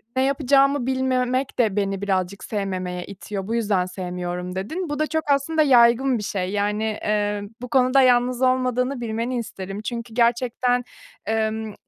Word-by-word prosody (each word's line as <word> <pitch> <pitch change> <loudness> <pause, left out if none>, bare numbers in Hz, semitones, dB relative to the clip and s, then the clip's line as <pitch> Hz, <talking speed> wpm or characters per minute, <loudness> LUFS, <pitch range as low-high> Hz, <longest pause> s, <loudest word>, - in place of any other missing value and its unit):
"Ne 260 - +2
yapacağımı 275 0 +3
bilmemek 260 0 0
de 215 -5 +2
beni 195 -1 -1
birazcık 190 -1 -1
sevmemeye 185 -4 -3
itiyor, 195 0 -6
bu 230 - -1
yüzden 205 -5 +1
sevmiyorum." 180 0 -5
dedin. 315 - -4
Bu 295 0 -3
da 310 - +1
çok 315 0 -1
aslında 310 +3 +2
yaygın 250 -1 +5
bir 210 - -5
şey, 185 -2 -2
yani, 205 +1 0
eee, 210 -1 -1 0.2
bu 250 - -6
konuda 260 +1 +4
yalnız 250 0 +3
olmadığını 255 0 +1
bilmeni 235 +2 -2
isterim. 195 -3 -6
Çünkü 235 0 -5
gerçekten, 245 +1 +1 0.4
emm, 220 0 -1
235 Hz, 150 wpm, -23 LUFS, 200-255 Hz, 0.4 s, yaygın